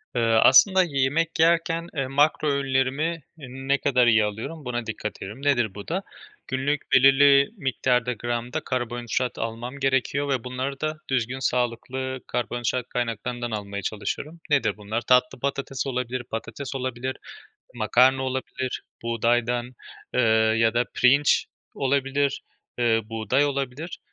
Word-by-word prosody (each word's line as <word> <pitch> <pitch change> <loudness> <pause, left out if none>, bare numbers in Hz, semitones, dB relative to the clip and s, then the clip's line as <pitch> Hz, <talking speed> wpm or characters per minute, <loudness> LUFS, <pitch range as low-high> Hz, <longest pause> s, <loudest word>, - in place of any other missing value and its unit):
Eee, 120 - +1
aslında 130 - +6
yemek 155 +2 0
yerken, 165 0 +2
eee, 135 -3 -1
makro 145 +3 +2
öğünlerimi 140 +4 0 0.2
ne 135 -1 -2
kadar 125 -3 +2
iyi 110 -2 +5
alıyorum 115 +9 -6
buna 120 -1 -3
dikkat 105 -1 -5
ederim. 105 +7 -7
Nedir 120 -8 +2
bu 100 -1 -8
da? 185 +4 -2 0.4
Günlük 135 +3 -1
belirli 140 +1 +6
miktarda 125 -4 0
gramda 120 +1 -3
karbonhidrat 120 0 -2
almam 120 +4 -5
gerekiyor 135 +1 0
ve 130 -4 0
bunları 130 +2 -4
da 155 0 -2
düzgün, 130 0 -1
sağlıklı 130 +1 -2
karbonhidrat 120 0 -2
kaynaklarından 120 0 -3
almaya 100 -2 -4
çalışıyorum. 140 +11 -4
Nedir 120 -8 +2
bunlar? 105 +3 -3
Tatlı 125 +1 +2
patates 140 0 -3
olabilir, 125 -1 -3
patates 115 +4 -6
olabilir, 130 0 -3 0.6
makarna 125 +4 +3
olabilir 130 -1 -3 0.2
buğdaydan, 120 +1 0 0.4
eee, - - +3 0.4
ya 115 0 +3
da 120 +1 +2
pirinç 140 +4 +4 0.3
olabilir, 140 0 0 0.4
eee, 115 -2 +3
buğday 115 +5 0
olabilir. 140 +3 -3
130 Hz, 125 wpm, -25 LUFS, 120-140 Hz, 0.6 s, aslında